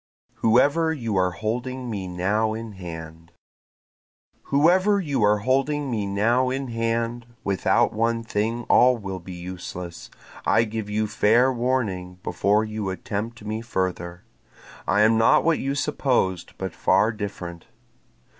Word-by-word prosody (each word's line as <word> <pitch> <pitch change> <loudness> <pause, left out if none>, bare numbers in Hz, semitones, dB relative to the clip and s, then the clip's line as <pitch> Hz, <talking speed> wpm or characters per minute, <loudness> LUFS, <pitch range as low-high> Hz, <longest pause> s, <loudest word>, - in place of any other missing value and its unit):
Whoever 145 +8 +3
You 115 -9 -3
Are 90 -1 +3
Holding 120 +7 -4
Me 100 -5 -4
Now 105 +5 0
in 115 0 -6
Hand 85 -3 -9 1.1
Whoever 185 +8 +4
you 145 - -1
are 105 0 +4
holding 135 +5 0
me 105 -3 -1
now 115 +6 +2
in 135 0 -3
hand, 115 +1 -2 0.2
Without 100 -1 +2
one 115 +1 0
thing 115 +2 -1
all 125 +2 +5
will 95 -4 -5
be 90 +1 -9
useless, 90 -1 -7 0.3
I 115 - +3
give 110 -1 -4
you 110 +1 0
fair 115 +5 +3
warning 115 -8 -1
before 105 +4 +1
you 110 -2 -4
attempt 105 +4 -5
me 110 +1 -3
further, 90 -4 -3 0.6
I 100 +2 +3
am 110 +1 +4
not 115 - +5
what 165 -1 +2
you 135 +1 -2
supposed, 125 - 0
but 95 -3 -4
far 105 +6 +3
different. 100 -5 -7
110 Hz, 135 wpm, -24 LUFS, 95-125 Hz, 1.1 s, all